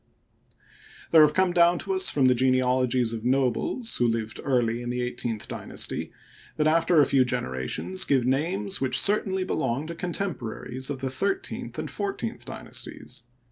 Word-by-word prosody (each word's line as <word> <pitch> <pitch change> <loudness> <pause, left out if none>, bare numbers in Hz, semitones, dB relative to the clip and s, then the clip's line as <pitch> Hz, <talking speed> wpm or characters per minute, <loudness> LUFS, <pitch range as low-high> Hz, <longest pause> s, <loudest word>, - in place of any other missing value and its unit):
There 160 - +8
have 150 -1 +5
come 185 -1 +2
down 175 0 +5
to 195 +3 -3
us 190 0 +2
the 130 -3 +4
genealogies 125 -1 +2
of 110 -1 -5
nobles 135 - 0
who 120 - +2
lived 110 -1 -2
early 120 -3 +1
in 120 - -5
the 125 0 -2
eighteenth 120 -3 -3
dynasty - - -3 0.5
that 150 - +1
after 165 +1 +4
a 145 - +6
few 135 -2 +3
generations 65 - -2
give 130 -4 +2
names 185 +10 0
which 130 - +3
certainly 195 -2 +3
belonged 135 -3 -2
to - - -4
contemporaries 145 - -4
of 135 -3 -4
the 135 - -2
thirteenth 385 - -3
and - - -4
fourteenth 400 -1 -4
dynasties. - - -7
135 Hz, 155 wpm, -26 LUFS, 125-175 Hz, 0.5 s, There